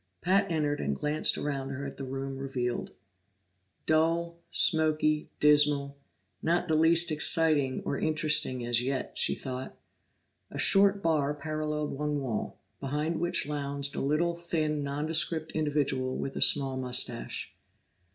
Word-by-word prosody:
Pat 195 +2 +2
entered 150 -3 -1
and 70 0 -1
glanced 150 - +2
around 135 -2 -3
her 140 +1 -5
at 140 - -8
the 135 - -6
room 135 0 -5
revealed. 125 -3 -3 1.0
Dull, 165 +2 +1
smoky, 155 -2 +2
dismal 145 -1 +3 0.5
not 175 +2 0
the 160 - 0
least 165 +2 +4
exciting 150 -3 +3
or 140 - -2
interesting 150 -5 +1
as 120 0 +3
yet, 130 +1 -3
she - - +2
thought. 130 -1 -7 0.7
A - - -8
short 200 0 +4
bar 150 -3 +1
paralleled 150 0 -3
one 150 +1 -2
wall, 125 -6 -4 0.2
behind 150 +4 -2
which 175 -3 +2
lounged 140 -1 -2
a - - -2
little, 155 +5 0
thin, 155 -3 -2
nondescript 155 +2 -1
individual 140 -4 -1
with 135 - -5
a - - -4
small 135 -2 +3
mustache. 125 - -2
150 Hz, 135 wpm, -29 LUFS, 135-160 Hz, 1.0 s, least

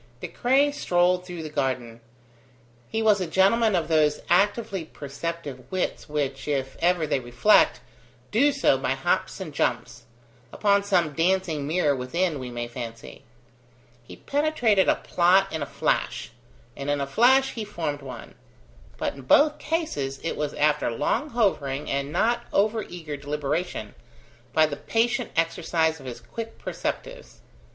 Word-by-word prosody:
De - - -5
Craye 275 +4 +2
strolled 180 -8 +1
through 175 -3 -6
the - - -5
garden. 130 -5 -2 0.9
He 225 0 -1
was 210 -3 +4
a 180 - -1
gentleman 200 +5 +3
of 165 -3 0
those 155 -2 +2
actively 200 0 +2
perceptive 145 -3 -7
wits 185 -4 -2
which, 140 -2 -2
if 135 -2 -2
ever 175 -1 +2
they 150 -2 0
reflect, 120 -1 +3 0.5
do 275 +7 +4
so - - +2
by - - 0
hops - - -1
and - - -6
jumps: - - -2 0.5
upon 200 -1 +2
some 175 -6 +1
dancing 165 -3 0
mirror 155 -3 +2
within, 150 +5 -1
we 130 -1 -6
may 120 0 -4
fancy. 115 -2 -8 0.8
He 120 - -12
penetrated 275 -9 +2
a - - +4
plot 185 +2 +2
in 160 - -3
a 145 - -3
flash; - - -1 0.4
and 140 +1 -5
in 145 0 +1
a 140 - -1
flash 260 - +4
he 225 - -5
formed 165 -8 -4
one; 135 -2 -9 0.6
but - - -2
in 140 - -11
both 295 - +4
cases, 145 - -2
it 165 - -2
was 150 -1 -3
after 150 -2 +2
long 205 - -1
hovering 150 - 0
and 140 +1 -2
not 235 +7 +1
over 215 +2 +2
eager 160 -7 -7
deliberation, 145 - -3 0.6
by 155 +4 +4
the 145 -2 -4
patient 230 - 0
exercise 165 -1 +1
of 135 - -10
his 120 -1 -7
quick 225 - -7
perceptives. - - -6
165 Hz, 150 wpm, -25 LUFS, 140-205 Hz, 0.9 s, was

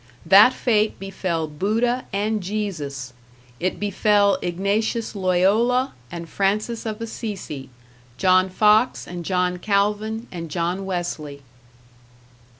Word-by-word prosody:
That 200 +8 +8
fate 215 -3 +1
befell 185 -4 -3
Buddha 225 +11 0
and 210 +2 -1
Jesus, 160 -10 -4 0.5
it 185 +1 -2
befell 205 0 +2
Ignatius 200 +6 -1
Loyola 205 +8 +2 0.2
and 170 -1 -6
Francis 215 +6 -1
of 215 +1 -5
Assisi, 200 - -6 0.5
John 185 0 +4
Fox 215 +5 +3
and 175 -1 -7
John 180 0 0
Calvin 210 +3 0
and 165 -2 -6
John 175 +4 -2
Wesley. 155 -6 -4
195 Hz, 105 wpm, -22 LUFS, 175-215 Hz, 0.5 s, That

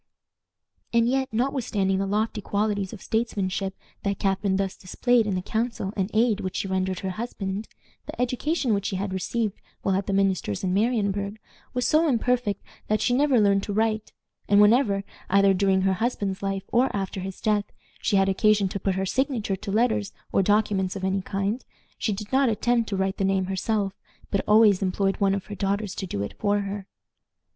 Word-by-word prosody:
And 235 0 +3
yet, 265 +1 0
notwithstanding 220 -6 0
the 195 - -1
lofty 215 +2 -1
qualities 205 -1 -1
of 215 - -10
statesmanship 195 -4 -1 0.3
that 200 0 -1
Catharine 195 0 +1
thus 195 -1 -1
displayed 235 +4 +1
in 200 - 0
the 185 - -2
counsel 220 -2 -2
and 190 -1 -1
aid 220 -1 +2
which 185 - -4
she - - -1
rendered 190 -1 -1
her 190 - -2
husband, 200 -1 -4 0.4
the - - -8
education 255 +1 0
which 200 -1 0
she 195 - -2
had 190 0 -2
received 210 +3 -2 0.2
while 195 - +1
at 195 0 -1
the 200 - 0
minister's 190 - 0
in 185 -1 0
Marienburg 200 -2 0 0.4
was 250 - +1
so 315 +2 +4
imperfect 240 -4 0 0.2
that 215 0 +1
she 245 - +1
never 270 -1 +4
learned 200 -1 +4
to 205 - -4
write, 220 0 0 0.4
and 200 0 +6
whenever, 210 -2 +4 0.3
either 195 0 +5
during 190 0 +2
her 190 0 +2
husband's 200 -2 -2
life 195 -1 -2
or 250 +3 +3
after 195 -1 -3
his 190 0 -6
death, 210 -1 +1 0.4
she - - +1
had 195 0 +4
occasion 205 +1 +3
to 200 - -4
put 195 0 0
her 190 0 -1
signature 240 -2 0
to 195 +1 -6
letters 220 -2 +1 0.2
or - - +3
documents 200 -1 +1
of 195 - -5
any 190 +1 0
kind, 200 +5 -2 0.4
she 220 - 0
did 210 +1 -5
not 270 -1 +4
attempt 230 +1 +1
to 200 - -1
write 190 0 0
the - - -1
name 190 -1 +2
herself, 195 +1 -1 0.4
but 200 - +1
always 210 -2 +6
employed 195 +1 0
one 195 -1 +2
of 200 - -4
her 210 - -8
daughters 200 +1 -1
to 190 - -5
do 100 - -3
it 100 - -5
for 205 0 +2
her. 200 0 -5
200 Hz, 195 wpm, -25 LUFS, 195-220 Hz, 0.4 s, and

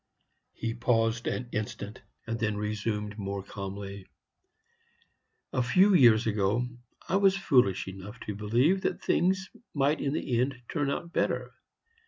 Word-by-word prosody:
He 115 0 -3
paused 115 -1 +1
an 125 - -2
instant, 105 -1 -4 0.2
and 115 0 -3
then 110 -2 0
resumed, 105 0 -3
more 100 -1 -3
calmly: 100 -1 -7 1.5
"A 130 - +2
few 185 +12 +5
years 120 -9 +6
ago 110 +3 +1 0.4
I 185 - +2
was 195 -1 +4
foolish 125 - +3
enough 95 +4 -8
to 105 - -4
believe 120 - +2
that - - -2
things 190 +1 +1 0.2
might 145 +2 +2
in 140 - 0
the 120 -5 0
end 130 0 -1
turn 145 -4 0
out 170 +4 -4
better. - - 0
115 Hz, 140 wpm, -29 LUFS, 105-140 Hz, 1.5 s, years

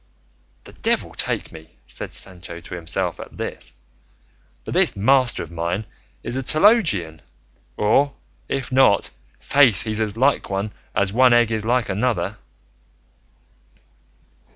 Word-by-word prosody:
"The - - -14
devil - - +2
take - - -2
me," 80 -5 -14
said - - -6
Sancho 85 -2 -8
to 85 - -11
himself 85 -2 -2
at - - -10
this, - - -5 0.9
"but - - -5
this - - +2
master 130 +4 +2
of 85 - -12
mine 85 +5 -2 0.4
is 120 - -4
a 135 - -1
theologian; 150 - +2 0.6
or, 140 +7 +2 0.3
if 135 -1 -3
not, 130 -6 +4 0.3
faith, 130 -9 +3
he's 110 -1 -2
as 110 -1 -1
like 135 +4 +2
one 100 +2 -3 0.2
as 100 0 +1
one 125 +1 +5
egg 120 -1 +4
is 110 -1 -2
like 120 0 +1
another." 110 +5 -1
110 Hz, 130 wpm, -22 LUFS, 95-130 Hz, 0.9 s, one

